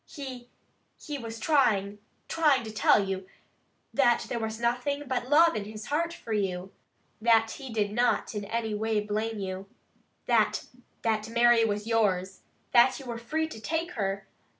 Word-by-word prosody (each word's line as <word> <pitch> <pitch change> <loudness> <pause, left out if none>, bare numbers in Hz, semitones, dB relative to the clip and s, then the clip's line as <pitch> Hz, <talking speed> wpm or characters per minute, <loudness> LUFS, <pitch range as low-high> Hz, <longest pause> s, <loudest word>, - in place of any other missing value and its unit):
He 255 -4 -8 0.5
he 295 -2 -5
was 225 -2 -7
trying 210 -8 +2 0.3
trying 295 -6 +3
to 220 - -6
tell 215 -1 +4
you, 190 -1 -4 0.7
that 240 -4 +3
there 235 - -2
was 220 0 -4
nothing 245 +5 0
but 250 -1 -2
love 330 +3 +6
in 205 - -3
his 215 +1 -8
heart 335 +3 +1
for 230 -9 -6
you. 190 -2 -2 0.5
That 225 -1 +4
he 265 -3 -8
did 210 -2 0
not 240 +1 +1
in 210 -1 -3
any 225 +1 -2
way 220 +1 0
blame 215 +2 -2
you. 190 0 -5 0.6
That - - +2 0.4
that 220 -1 0
Mary 235 0 +5
was 210 -1 -2
yours. 195 -5 0 0.3
That 245 +2 +5
you 270 - -10
were 235 -2 -5
free 315 +7 -1
to 220 - -9
take 330 +6 -2
her. 195 - -2
225 Hz, 165 wpm, -28 LUFS, 210-255 Hz, 0.7 s, love